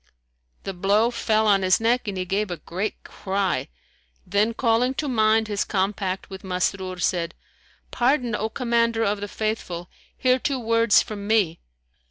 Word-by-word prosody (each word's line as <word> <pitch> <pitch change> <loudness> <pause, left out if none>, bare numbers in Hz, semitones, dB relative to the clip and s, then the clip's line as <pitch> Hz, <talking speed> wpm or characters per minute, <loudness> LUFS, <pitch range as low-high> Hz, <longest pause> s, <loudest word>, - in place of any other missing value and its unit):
The 195 - -4
blow 205 +6 +2
fell 220 -2 +1
on 200 -2 +4
his 185 -1 +3
neck 235 +1 +1
and 200 -2 -3
he 185 - -2
gave 200 +3 -1
a 175 - -4
great 190 +7 -4
cry, 195 0 -2 0.6
then 205 +5 +1
calling 245 +2 +2
to 300 - -2
mind 220 -3 +3
his 205 -1 -1
compact 190 -1 -2
with 190 -1 -9
Masrur, 185 0 -2
said, 170 -2 -1 0.6
"Pardon, 245 -1 +1
O 215 +1 -1
Commander 230 -2 +1
of 205 -1 0
the 205 - -3
Faithful! 195 -5 -4 0.3
Hear 255 0 +3
two 275 +1 -1
words 230 -1 +4
from 205 -2 -7
me." 205 -7 +2
210 Hz, 160 wpm, -24 LUFS, 190-230 Hz, 0.6 s, on